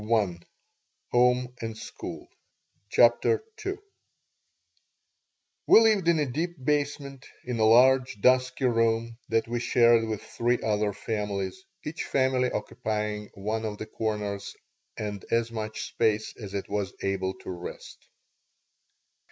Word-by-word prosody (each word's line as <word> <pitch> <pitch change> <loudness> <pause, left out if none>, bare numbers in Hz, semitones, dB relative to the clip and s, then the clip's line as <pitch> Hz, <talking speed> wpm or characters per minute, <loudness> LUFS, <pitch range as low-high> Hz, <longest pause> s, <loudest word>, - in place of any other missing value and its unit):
She 105 - -9
did 120 +5 -1
not 115 -1 -5 1.1
CHAPTER 120 - +4 0.2
II 390 0 -1 1.9
WE - - +9
lived 215 -6 +3
in 170 -1 +5
a 150 - +2
deep 160 +7 -3
basement, 140 -2 -1 0.2
in 125 -2 -3
a 110 - +4
large, 125 0 +5
dusky 130 +3 +3
room 115 -1 +1
that 115 0 +1
we 120 +1 -2
shared 115 -1 +4
with 110 -2 -4
three 120 +1 0
other 105 -1 +1
families, 105 - -3 0.2
each 155 +3 -4
family 130 -2 +1
occupying 105 0 -3
one 110 +3 -2
of 105 -2 -3
the 110 - -5
corners 105 -3 -3 0.4
and 105 -2 -4
as 115 0 +1
much 110 -1 -4
space 110 -1 0
as 100 -3 -8
it 100 - -3
was 100 -2 -3
able 95 -1 -1
to - - -8
wrest. 90 -1 -9
115 Hz, 125 wpm, -27 LUFS, 105-125 Hz, 1.9 s, WE